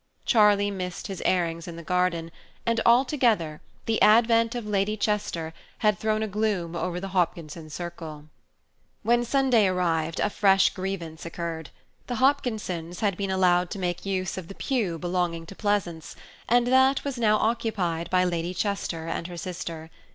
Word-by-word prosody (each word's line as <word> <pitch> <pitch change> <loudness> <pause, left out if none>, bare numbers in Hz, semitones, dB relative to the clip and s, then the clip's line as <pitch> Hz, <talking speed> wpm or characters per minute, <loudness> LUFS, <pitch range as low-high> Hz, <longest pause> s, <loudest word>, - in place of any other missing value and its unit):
Charlie 205 -3 +4
missed 180 -2 -5
his 195 -2 -5
airings 170 -2 0
in 170 - -7
the 170 - -8
garden, 170 -1 0 0.3
and 230 0 +1
altogether 235 - +3 0.2
the 225 -1 0
advent 230 +1 +5
of 240 -3 -4
Lady 210 +1 0
Chester 195 -6 -1 0.3
had 210 -3 +3
thrown 215 0 0
a - - -1
gloom 200 -5 -1
over 175 +1 -2
the 195 +1 -5
Hopkinson 170 -3 -2
circle. 160 -2 -7 0.8
When 240 +1 +3
Sunday 245 -4 +3
arrived, 165 -3 0
a - - +1
fresh 195 -2 +4
grievance 185 -4 -5
occurred. 170 -2 -5 0.4
The 245 - -2
Hopkinsons 220 - 0
had 200 -4 +1
been 195 +1 -3
allowed 180 -1 +3
to 210 - -5
make 175 -2 -2
use 190 -1 -2
of 175 - -10
the 195 - -9
pew 220 - -1
belonging 175 -1 -2
to 195 - -11
Pleasance, 195 -7 -2 0.3
and 240 +1 +4
that 260 +2 +4
was 275 -3 -4
now 215 -2 +4
occupied 210 -8 -1
by 185 0 +3
Lady 175 0 -2
Chester 180 -5 -2
and 165 0 -3
her 175 -1 -8
sister. 165 -2 -6
185 Hz, 160 wpm, -26 LUFS, 170-215 Hz, 0.8 s, advent